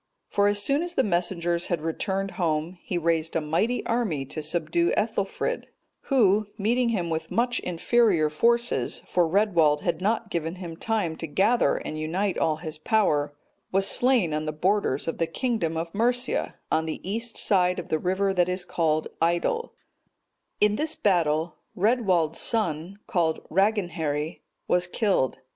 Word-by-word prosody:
For 205 Hz, 0 st, +2 dB
as 205 Hz, 0 st, +2 dB
soon 275 Hz, +9 st, +1 dB
as 350 Hz, 0 st, -4 dB
the -, -, +3 dB
messengers 175 Hz, -3 st, 0 dB
had 175 Hz, -, -1 dB
returned 190 Hz, +4 st, -2 dB
home, 165 Hz, +1 st, -2 dB
he 185 Hz, -, -3 dB
raised 165 Hz, -1 st, 0 dB
a -, -, +3 dB
mighty 165 Hz, +11 st, 0 dB
army 210 Hz, -, -1 dB
to 155 Hz, +4 st, -6 dB
subdue 170 Hz, +2 st, +1 dB
Ethelfrid; 205 Hz, -2 st, -1 dB, 0.4 s
who, 215 Hz, -6 st, +3 dB
meeting 235 Hz, +4 st, +1 dB
him 180 Hz, -7 st, -1 dB
with 160 Hz, 0 st, -3 dB
much 245 Hz, +1 st, +1 dB
inferior 180 Hz, -1 st, +2 dB
forces, 235 Hz, +10 st, +1 dB
(for 175 Hz, -2 st, +2 dB
Redwald 165 Hz, -6 st, +3 dB
had 170 Hz, -1 st, -1 dB
not 220 Hz, +2 st, 0 dB
given 165 Hz, -1 st, -2 dB
him 175 Hz, -3 st, -7 dB
time 200 Hz, -3 st, -1 dB
to 165 Hz, -, -5 dB
gather 200 Hz, +11 st, +2 dB
and 155 Hz, -, -5 dB
unite 180 Hz, +5 st, -1 dB
all 155 Hz, -, +2 dB
his 155 Hz, -1 st, -7 dB
power,) 150 Hz, -7 st, +1 dB, 0.4 s
was 195 Hz, +1 st, +3 dB
slain 240 Hz, -9 st, +3 dB
on 155 Hz, 0 st, -2 dB
the -, -, 0 dB
borders 175 Hz, -3 st, 0 dB
of 165 Hz, -, -3 dB
the 165 Hz, -, +1 dB
kingdom 170 Hz, -5 st, -1 dB
of 165 Hz, +1 st, -4 dB
Mercia, 245 Hz, +4 st, 0 dB, 0.2 s
on 160 Hz, 0 st, +1 dB
the 160 Hz, -, -5 dB
east 230 Hz, +4 st, -3 dB
side 180 Hz, -2 st, +2 dB
of 175 Hz, -, -6 dB
the 155 Hz, -, +1 dB
river 190 Hz, +3 st, 0 dB
that 180 Hz, -1 st, +2 dB
is 180 Hz, 0 st, -1 dB
called 155 Hz, -2 st, 0 dB
Idle.(229) 175 Hz, -, +1 dB, 0.9 s
In 210 Hz, 0 st, +4 dB
this 315 Hz, +1 st, -1 dB
battle, 165 Hz, -4 st, +1 dB, 0.2 s
Redwald's 185 Hz, -7 st, +2 dB
son, 195 Hz, -5 st, 0 dB
called 170 Hz, -8 st, 0 dB
Raegenheri, 170 Hz, -6 st, 0 dB, 0.3 s
was 180 Hz, 0 st, +2 dB
killed. 190 Hz, -, 0 dB
180 Hz, 160 wpm, -26 LUFS, 160-215 Hz, 0.9 s, In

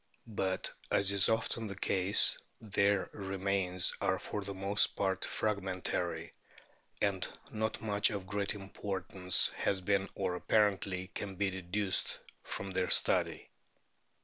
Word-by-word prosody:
But, 95 Hz, -4 st, -2 dB, 0.2 s
as 100 Hz, 0 st, +3 dB
is 100 Hz, -1 st, +4 dB
so 110 Hz, -, +5 dB
often 115 Hz, 0 st, -4 dB
the 100 Hz, -, -6 dB
case, 95 Hz, 0 st, +3 dB, 0.2 s
their 100 Hz, -2 st, +2 dB
remains 95 Hz, -2 st, 0 dB
are -, -, +2 dB
for 105 Hz, -, -5 dB
the 100 Hz, 0 st, -6 dB
most 100 Hz, +2 st, +2 dB
part 95 Hz, -1 st, 0 dB
fragmentary, 90 Hz, -5 st, -2 dB, 0.7 s
and 100 Hz, -2 st, 0 dB, 0.2 s
not 110 Hz, 0 st, -2 dB
much 105 Hz, -2 st, +3 dB
of 100 Hz, -3 st, -4 dB
great 105 Hz, +1 st, -2 dB
importance 95 Hz, -2 st, +1 dB
has 95 Hz, -, 0 dB
been 100 Hz, +1 st, 0 dB
or 90 Hz, -, -1 dB
apparently 95 Hz, -1 st, +1 dB
can 100 Hz, -1 st, -5 dB
be 100 Hz, +1 st, 0 dB
deduced 95 Hz, +2 st, -1 dB, 0.2 s
from 100 Hz, 0 st, -3 dB
their 95 Hz, -1 st, 0 dB
study. -, -, +2 dB
100 Hz, 130 wpm, -33 LUFS, 95-100 Hz, 0.7 s, so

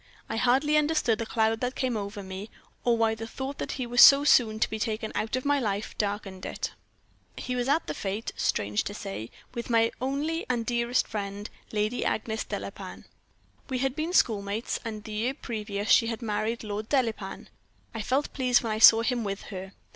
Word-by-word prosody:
I -, -, -3 dB
hardly 265 Hz, +6 st, +3 dB
understood 300 Hz, -7 st, +2 dB
the 230 Hz, -, -3 dB
cloud 220 Hz, 0 st, +1 dB
that 250 Hz, +1 st, -1 dB
came 255 Hz, -3 st, -1 dB
over 200 Hz, -1 st, -4 dB
me, 190 Hz, +3 st, -7 dB, 0.3 s
or 235 Hz, -1 st, +3 dB
why 225 Hz, -1 st, +2 dB
the 225 Hz, 0 st, -6 dB
thought 265 Hz, +4 st, -6 dB
that -, -, -3 dB
he 255 Hz, -, -3 dB
was 245 Hz, 0 st, +4 dB
so 280 Hz, 0 st, +10 dB
soon 225 Hz, -6 st, +4 dB
to -, -, +3 dB
be 220 Hz, -, -5 dB
taken 220 Hz, -1 st, -2 dB
out 220 Hz, +2 st, -1 dB
of 255 Hz, -, -3 dB
my 285 Hz, 0 st, +3 dB
life 210 Hz, -4 st, -2 dB
darkened 200 Hz, -2 st, -3 dB
it. -, -, -4 dB, 0.7 s
"He 250 Hz, -, -3 dB
was 245 Hz, +1 st, -1 dB
at 315 Hz, +4 st, +2 dB
the -, -, -3 dB
fete, 200 Hz, +3 st, -3 dB
strange 105 Hz, +1 st, 0 dB
to 205 Hz, -, -5 dB
say, 195 Hz, -, -6 dB, 0.2 s
with 235 Hz, -1 st, -5 dB
my 230 Hz, -1 st, +3 dB
only 290 Hz, +5 st, -1 dB
and 240 Hz, -2 st, 0 dB
dearest 240 Hz, +1 st, +1 dB
friend, 205 Hz, -1 st, -4 dB, 0.2 s
Lady 215 Hz, +3 st, 0 dB
Agnes 220 Hz, 0 st, -1 dB
Delapain. -, -, -7 dB, 0.6 s
We 260 Hz, -, -1 dB
had 265 Hz, +1 st, 0 dB
been 315 Hz, +3 st, -2 dB
schoolmates, 215 Hz, -, +1 dB
and 215 Hz, -3 st, -5 dB
the 215 Hz, -, -8 dB
year 225 Hz, +5 st, -1 dB
previous 210 Hz, -5 st, -3 dB
she 230 Hz, -, +6 dB
had 230 Hz, +1 st, -4 dB
married 215 Hz, +2 st, -1 dB
Lord 210 Hz, +1 st, -4 dB
Delapain. 225 Hz, -8 st, -1 dB, 0.4 s
I 225 Hz, -, -4 dB
felt 265 Hz, +7 st, 0 dB
pleased 250 Hz, -2 st, +3 dB
when 225 Hz, -, -2 dB
I 215 Hz, -, -1 dB
saw 225 Hz, 0 st, +9 dB
him 240 Hz, -1 st, 0 dB
with 200 Hz, -1 st, -4 dB
her. 190 Hz, +1 st, -7 dB
225 Hz, 200 wpm, -28 LUFS, 210-250 Hz, 0.7 s, so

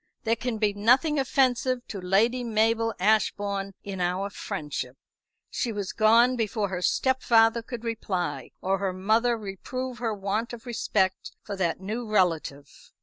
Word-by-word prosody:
"There 230 Hz, 0 st, +2 dB
can 235 Hz, 0 st, -3 dB
be 210 Hz, -1 st, +1 dB
nothing 255 Hz, +9 st, +3 dB
offensive 255 Hz, -2 st, +1 dB
to 200 Hz, -, -5 dB
Lady 220 Hz, +7 st, +2 dB
Mabel 225 Hz, 0 st, +1 dB
Ashbourne 200 Hz, -1 st, +1 dB
in 195 Hz, -2 st, -5 dB
our 185 Hz, +3 st, -1 dB
friendship." 150 Hz, -11 st, -5 dB, 0.5 s
She 235 Hz, -, -1 dB
was 205 Hz, -3 st, -4 dB
gone 235 Hz, +3 st, +5 dB
before 215 Hz, -3 st, -1 dB
her 180 Hz, -1 st, -3 dB
stepfather 235 Hz, 0 st, +3 dB
could 235 Hz, 0 st, -7 dB
reply, 205 Hz, -6 st, -3 dB
or 195 Hz, +1 st, 0 dB
her 195 Hz, -2 st, -1 dB
mother 220 Hz, +6 st, +2 dB
reprove 240 Hz, +5 st, -5 dB
her 225 Hz, -3 st, -1 dB
want 205 Hz, +4 st, -2 dB
of 240 Hz, +1 st, -9 dB
respect 195 Hz, -5 st, -1 dB
for 205 Hz, -, -5 dB
that 175 Hz, -2 st, -1 dB
new 220 Hz, +4 st, -4 dB
relative. 165 Hz, -8 st, +1 dB
215 Hz, 145 wpm, -26 LUFS, 195-235 Hz, 0.5 s, gone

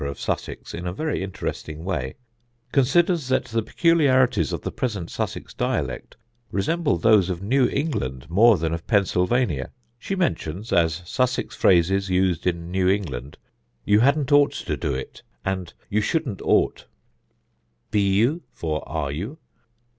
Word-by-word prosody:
of 70 Hz, -, -6 dB
Sussex -, -, -4 dB
in 90 Hz, +1 st, -5 dB
a 90 Hz, -, -2 dB
very 155 Hz, -, -2 dB
interesting 80 Hz, -4 st, -5 dB
way), 75 Hz, -9 st, -3 dB, 0.6 s
considers 160 Hz, +3 st, +3 dB
that 130 Hz, 0 st, +1 dB
the 115 Hz, 0 st, -1 dB
peculiarities 130 Hz, -, +3 dB
of -, -, -3 dB
the -, -, -3 dB
present 105 Hz, -9 st, -3 dB
Sussex -, -, -4 dB
dialect -, -, -3 dB, 0.3 s
resemble 145 Hz, -, 0 dB
those 105 Hz, -5 st, +4 dB
of 90 Hz, 0 st, -3 dB
New 125 Hz, +5 st, +3 dB
England 70 Hz, -, -2 dB
more 105 Hz, +5 st, +5 dB
than 80 Hz, 0 st, -1 dB
of 85 Hz, 0 st, -5 dB
Pennsylvania. 95 Hz, -, +1 dB, 0.3 s
She 195 Hz, -, -3 dB
mentions 110 Hz, -, -2 dB
as 85 Hz, 0 st, +2 dB
Sussex 125 Hz, +7 st, -1 dB
phrases 95 Hz, +2 st, +3 dB
used 90 Hz, -2 st, +1 dB
in 85 Hz, -1 st, -2 dB
New 95 Hz, 0 st, +2 dB
England 75 Hz, -9 st, -2 dB, 0.5 s
'You 105 Hz, 0 st, +4 dB
hadn't 140 Hz, +3 st, +2 dB
ought 145 Hz, 0 st, +5 dB
to -, -, -3 dB
do 70 Hz, -, -2 dB
it,' 65 Hz, -, -7 dB, 0.2 s
and 95 Hz, -2 st, -2 dB, 0.2 s
'You 105 Hz, +1 st, +1 dB
shouldn't 130 Hz, -, -1 dB
ought'; -, -, +1 dB, 1.0 s
'Be 105 Hz, -, +3 dB
you'? 110 Hz, -, +2 dB
for 80 Hz, -2 st, -3 dB
'Are 75 Hz, -3 st, -2 dB
you'? 100 Hz, -, -5 dB
95 Hz, 145 wpm, -24 LUFS, 85-130 Hz, 1.0 s, more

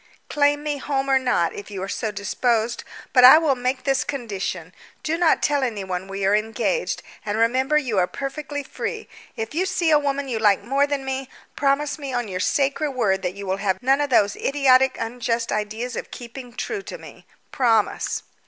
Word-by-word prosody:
"Claim 290 Hz, 0 st, +2 dB
me, 295 Hz, -1 st, -2 dB
home 275 Hz, -1 st, -1 dB
or 265 Hz, -, +5 dB
not, 245 Hz, -10 st, +1 dB
if 205 Hz, -, -9 dB
you 195 Hz, -2 st, -5 dB
are -, -, -4 dB
so 220 Hz, +2 st, -2 dB
disposed, 225 Hz, +3 st, -1 dB, 0.3 s
but 250 Hz, -, +6 dB
I 260 Hz, +4 st, +11 dB
will 315 Hz, -3 st, +3 dB
make 255 Hz, +1 st, -2 dB
this 270 Hz, -1 st, +1 dB
condition. 195 Hz, -, -4 dB, 0.3 s
Do 315 Hz, -, 0 dB
not 335 Hz, -1 st, +2 dB
tell 290 Hz, -1 st, +2 dB
anyone 190 Hz, -7 st, -3 dB
we 195 Hz, 0 st, -3 dB
are 195 Hz, -, +3 dB
engaged, 225 Hz, -, -1 dB, 0.2 s
and 210 Hz, 0 st, -2 dB
remember 260 Hz, +6 st, +2 dB
you 245 Hz, -9 st, 0 dB
are 180 Hz, -, +2 dB
perfectly 285 Hz, +3 st, -5 dB
free. -, -, -5 dB, 0.3 s
If 225 Hz, +3 st, -4 dB
you 365 Hz, +5 st, 0 dB
see 355 Hz, -4 st, +1 dB
a 300 Hz, -, +6 dB
woman 280 Hz, -1 st, -2 dB
you 235 Hz, -4 st, -2 dB
like 205 Hz, -3 st, +3 dB
more 275 Hz, +3 st, +2 dB
than 285 Hz, -2 st, -2 dB
me, 265 Hz, 0 st, -3 dB, 0.3 s
promise 285 Hz, +2 st, 0 dB
me 280 Hz, -2 st, -5 dB
on 245 Hz, -2 st, -1 dB
your 185 Hz, -2 st, -4 dB
sacred 280 Hz, +7 st, 0 dB
word 195 Hz, -6 st, +1 dB
that 180 Hz, 0 st, -3 dB
you 200 Hz, 0 st, -7 dB
will 190 Hz, 0 st, -1 dB
have 195 Hz, -1 st, -1 dB
none 270 Hz, +3 st, +3 dB
of 290 Hz, -, -1 dB
those 205 Hz, -5 st, +3 dB
idiotic 265 Hz, -2 st, +3 dB
unjust 230 Hz, 0 st, -2 dB
ideas 220 Hz, +4 st, -3 dB
of -, -, -5 dB
keeping 245 Hz, +1 st, -9 dB
true 410 Hz, -, -3 dB
to -, -, -8 dB
me. -, -, -14 dB, 0.2 s
Promise." 230 Hz, -5 st, +1 dB
255 Hz, 200 wpm, -23 LUFS, 210-280 Hz, 0.3 s, I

